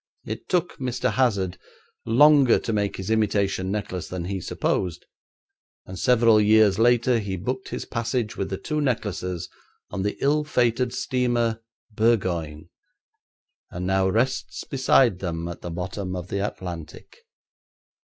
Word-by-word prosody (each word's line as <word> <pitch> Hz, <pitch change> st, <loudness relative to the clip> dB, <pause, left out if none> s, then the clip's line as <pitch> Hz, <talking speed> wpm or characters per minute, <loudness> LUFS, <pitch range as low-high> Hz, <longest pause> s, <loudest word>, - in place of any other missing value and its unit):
It -, -, -6 dB
took 180 Hz, -1 st, 0 dB
Mr. 125 Hz, -2 st, -1 dB
Hazard 100 Hz, -8 st, +1 dB, 0.5 s
longer 140 Hz, +1 st, +6 dB
to 115 Hz, -, -3 dB
make 105 Hz, -1 st, 0 dB
his 95 Hz, +3 st, -4 dB
imitation 100 Hz, -3 st, +1 dB
necklace 95 Hz, -4 st, -3 dB
than 90 Hz, -2 st, -5 dB
he 95 Hz, 0 st, -3 dB
supposed, 90 Hz, +1 st, -2 dB, 0.8 s
and 95 Hz, -1 st, -8 dB
several 115 Hz, -2 st, +5 dB
years 105 Hz, -1 st, +4 dB
later 120 Hz, +1 st, +4 dB
he 100 Hz, -3 st, -3 dB
booked 130 Hz, +8 st, -4 dB
his -, -, -5 dB
passage 115 Hz, -1 st, -2 dB
with 95 Hz, -, -3 dB
the 95 Hz, -, -3 dB
two 155 Hz, +6 st, -2 dB
necklaces 90 Hz, -, -2 dB, 0.4 s
on 95 Hz, -, -3 dB
the 105 Hz, +1 st, -2 dB
ill 150 Hz, +2 st, +2 dB
fated 125 Hz, -4 st, +1 dB
steamer 120 Hz, -3 st, 0 dB, 0.3 s
Burgoyne, 90 Hz, -9 st, 0 dB, 1.0 s
and 90 Hz, +1 st, -5 dB
now 95 Hz, 0 st, +2 dB
rests 120 Hz, +6 st, -1 dB
beside 130 Hz, -6 st, +3 dB
them 85 Hz, -3 st, -3 dB
at 85 Hz, -, -7 dB
the 85 Hz, -, -6 dB
bottom 90 Hz, +2 st, -4 dB
of 90 Hz, 0 st, -6 dB
the 100 Hz, -, -2 dB
Atlantic. 90 Hz, -, -7 dB
105 Hz, 140 wpm, -24 LUFS, 95-120 Hz, 1.0 s, longer